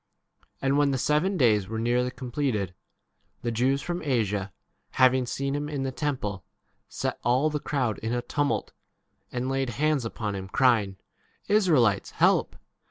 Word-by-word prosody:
And 135 Hz, +1 st, +2 dB
when 145 Hz, -1 st, +4 dB
the 135 Hz, -, 0 dB
seven 150 Hz, +9 st, +1 dB
days 105 Hz, -, +3 dB
were 110 Hz, +2 st, -4 dB
nearly 120 Hz, +2 st, +1 dB
completed, 125 Hz, -, -2 dB, 0.7 s
the 120 Hz, -, -1 dB
Jews 130 Hz, +5 st, +1 dB
from 175 Hz, 0 st, -3 dB
Asia, 105 Hz, -, -1 dB, 0.4 s
having 130 Hz, -1 st, +4 dB
seen 140 Hz, +2 st, -2 dB
him 145 Hz, +1 st, -3 dB
in 140 Hz, -3 st, -3 dB
the 135 Hz, -, -2 dB
temple, 125 Hz, -, -3 dB, 0.5 s
set -, -, -3 dB
all 130 Hz, +6 st, +2 dB
the 150 Hz, -, -1 dB
crowd 135 Hz, -6 st, -1 dB
in 110 Hz, -, -3 dB
a 120 Hz, 0 st, -1 dB
tumult, 145 Hz, +1 st, -1 dB, 0.6 s
and 125 Hz, +1 st, -2 dB
laid 135 Hz, -1 st, -1 dB
hands 145 Hz, +3 st, +1 dB
upon 110 Hz, -2 st, -3 dB
28 100 Hz, -, -3 dB
him, 95 Hz, 0 st, -8 dB
crying,P 115 Hz, -, -1 dB
Israelites, 145 Hz, -, +3 dB
help -, -, +3 dB
130 Hz, 160 wpm, -27 LUFS, 110-145 Hz, 0.7 s, when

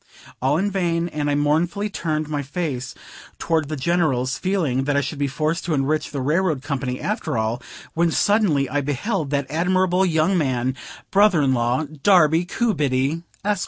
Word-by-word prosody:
All 135 Hz, +4 st, +2 dB
in 200 Hz, +3 st, 0 dB
vain: 170 Hz, -3 st, 0 dB
and 150 Hz, -2 st, -2 dB
I 145 Hz, -, +1 dB
mournfully 160 Hz, +8 st, +1 dB
turned 155 Hz, -6 st, -2 dB
my 150 Hz, -1 st, -2 dB
face 135 Hz, -4 st, -4 dB, 0.4 s
toward 160 Hz, -3 st, 0 dB
the 155 Hz, -, -2 dB
General's, 135 Hz, -4 st, 0 dB
feeling 160 Hz, -9 st, 0 dB
that 145 Hz, 0 st, +1 dB
I -, -, +3 dB
should 140 Hz, +2 st, -5 dB
be 140 Hz, -, +1 dB
forced 155 Hz, +4 st, -1 dB
to 165 Hz, -3 st, 0 dB
enrich 145 Hz, +3 st, 0 dB
the 140 Hz, -2 st, -4 dB
railroad 155 Hz, 0 st, 0 dB
company 130 Hz, -3 st, -3 dB
after -, -, -2 dB
all; 110 Hz, +2 st, -1 dB, 0.3 s
when, 170 Hz, +1 st, +2 dB
suddenly, 170 Hz, -7 st, +2 dB
I 145 Hz, +3 st, -1 dB
beheld 145 Hz, -, -2 dB
that 140 Hz, -1 st, 0 dB
admirable 180 Hz, +3 st, +2 dB
young 165 Hz, +1 st, +2 dB
man, 130 Hz, -3 st, 0 dB, 0.4 s
brother 195 Hz, -6 st, +4 dB
in 130 Hz, -1 st, +3 dB
law 120 Hz, +4 st, +1 dB
Darby 160 Hz, +2 st, +3 dB
Coobiddy, 150 Hz, -, 0 dB, 0.2 s
Esq. 205 Hz, -2 st, +1 dB
155 Hz, 170 wpm, -22 LUFS, 135-175 Hz, 0.4 s, brother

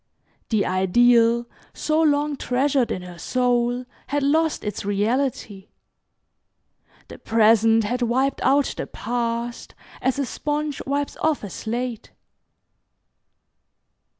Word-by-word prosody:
The 215 Hz, -3 st, +1 dB
ideal 230 Hz, +5 st, +3 dB, 0.3 s
so 310 Hz, +1 st, +1 dB
long 295 Hz, -1 st, +2 dB
treasured 265 Hz, 0 st, 0 dB
in 185 Hz, -, -3 dB
her 175 Hz, -1 st, -10 dB
soul 245 Hz, +1 st, 0 dB, 0.2 s
had 290 Hz, +1 st, -1 dB
lost 315 Hz, +3 st, +1 dB
its 210 Hz, -2 st, -4 dB
reality. 205 Hz, 0 st, -1 dB, 1.4 s
The -, -, -11 dB
present 225 Hz, 0 st, +4 dB
had 245 Hz, +4 st, -2 dB
wiped 260 Hz, +3 st, 0 dB
out 275 Hz, +1 st, +2 dB
the -, -, -4 dB
past 235 Hz, 0 st, -4 dB, 0.3 s
as 260 Hz, +1 st, 0 dB
a 280 Hz, -, 0 dB
sponge 295 Hz, +3 st, -3 dB
wipes 285 Hz, +1 st, -2 dB
off 310 Hz, -5 st, 0 dB
a 200 Hz, -, -6 dB
slate. 235 Hz, +2 st, -4 dB
245 Hz, 110 wpm, -23 LUFS, 225-280 Hz, 1.4 s, present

